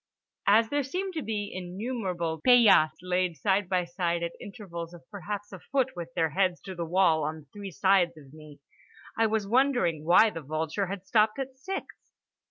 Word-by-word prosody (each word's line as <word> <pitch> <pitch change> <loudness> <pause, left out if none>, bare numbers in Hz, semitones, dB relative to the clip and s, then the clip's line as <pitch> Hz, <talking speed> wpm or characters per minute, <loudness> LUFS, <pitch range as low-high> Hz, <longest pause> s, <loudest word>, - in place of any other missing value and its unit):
As 220 +3 +5
there 290 0 +1
seemed 365 +8 -4
to 320 - -3
be 210 -4 -3
innumerable 180 -4 -4
paillasses, 215 -11 +6
laid 180 -2 0
side 195 -2 +1
by 180 -2 +1
side 170 -1 -2
at 170 - -2
intervals 175 -5 -8
of 170 0 -16
perhaps 205 +1 -6
a 190 - -9
foot 260 +6 -1
with 170 -1 -7
their 160 -1 +1
heads 185 +1 +1
to 190 - -8
the 170 -2 -4
wall 165 -3 +3
on 155 0 -4
three 205 -1 -7
sides 185 -2 +2
of 140 -2 -15
me, 155 -2 -13 0.6
I 225 0 +3
was 220 -1 -1
wondering 240 - +2
why 180 +7 +5
the 165 - -6
vulture 155 +6 -2
had 195 0 -6
stopped 215 +3 +2
at 270 -1 -5
six. 370 +9 -5
190 Hz, 180 wpm, -28 LUFS, 170-220 Hz, 0.6 s, paillasses